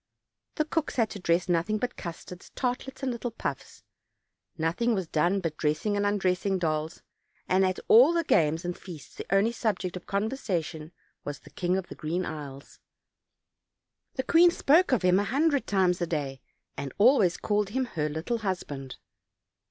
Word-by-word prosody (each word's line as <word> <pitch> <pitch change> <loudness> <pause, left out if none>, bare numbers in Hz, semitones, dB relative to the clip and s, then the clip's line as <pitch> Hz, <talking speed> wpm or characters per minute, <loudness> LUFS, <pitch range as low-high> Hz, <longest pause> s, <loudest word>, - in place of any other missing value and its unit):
The 310 - +1
cooks 315 0 -2
had 225 -3 +1
to 205 - -6
dress 175 0 +1
nothing 175 +4 +1
but 250 +3 -3
custards, 175 0 -8
tartlets 255 +2 -3
and 260 - 0
little 240 0 -3
puffs. 230 - -6 0.7
Nothing 175 +9 +1
was 190 -4 -2
done 175 +6 +1
but 160 -3 -3
dressing 155 +8 0
and 205 0 +1
undressing 195 -1 +1
dolls, 160 -2 -2 0.4
and 185 +1 +3
at 185 0 0
all 250 +8 +8
the 340 -1 +1
games 160 - +2
and 175 0 -2
feasts 170 -6 -11
the - - -8
only 195 +4 +3
subject 205 -6 -2
of 180 - -8
conversation 190 - -2 0.3
was 145 -1 -6
the - - -16
King 180 0 0
of 190 - -3
the - - -9
Green 170 +4 -3
Isles. 145 -3 -8 1.4
The 260 - -1
queen 340 +5 +6
spoke 340 +1 +3
of 250 -6 +2
him 180 +1 +4
a - - +1
hundred 280 +6 +1
times 185 -3 +2
a 175 - 0
day, 140 -5 -3 0.3
and 140 -1 -5
always 205 -5 +5
called 210 -1 0
him 260 +5 -1
her 155 -10 -2
little 160 +10 -2
husband. 145 -10 -4
185 Hz, 170 wpm, -28 LUFS, 165-230 Hz, 1.4 s, all